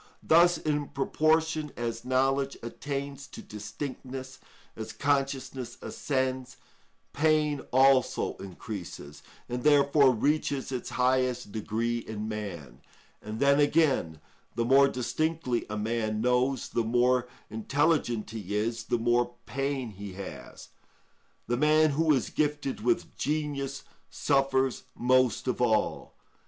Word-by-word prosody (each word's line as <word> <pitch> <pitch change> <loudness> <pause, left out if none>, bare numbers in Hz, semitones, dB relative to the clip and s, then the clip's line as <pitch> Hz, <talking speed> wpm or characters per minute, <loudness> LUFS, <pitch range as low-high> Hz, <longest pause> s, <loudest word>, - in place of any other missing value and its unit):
Thus, 170 +1 +5
in 150 -2 -1
proportion 155 +1 +1
as 115 -1 -3
knowledge 135 +2 +1
attains 140 +3 -5
to - - -10
distinctness, 130 +4 -7 0.4
as 110 - -6
consciousness 135 -3 -1
ascends, 130 -2 -2 0.6
pain 150 -1 +2
also 130 0 +3
increases, 90 -6 -8 0.3
and 125 0 -3
therefore 140 0 +5
reaches 140 +2 0
its 125 -2 -4
highest 125 -2 +1
degree 115 +2 -1
in 110 -2 -6
man. 85 - -6 0.4
And 110 +1 -6
then, 140 +1 +4
again, 145 - +2 0.4
the 115 - 0
more 135 +3 +6
distinctly 130 +1 -1
a 105 - -3
man 110 0 -1
knows, 125 +2 +1
the 115 - 0
more 125 +2 +2 0.2
intelligent 120 -1 0
he 105 -3 -5
is, 115 +2 -1
the 120 - 0
more 120 +1 +1
pain 135 -3 -2
he 100 -1 -8
has; 95 0 -9 0.8
the 120 +1 -1
man 155 +2 +4
who 155 +2 +2
is 135 -5 +1
gifted 145 -5 -1
with 120 +1 0
genius 145 -2 -2 0.3
suffers 135 -2 +1
most 130 -1 +2
of 125 -1 -1
all. 110 -3 0
130 Hz, 120 wpm, -28 LUFS, 115-140 Hz, 0.8 s, more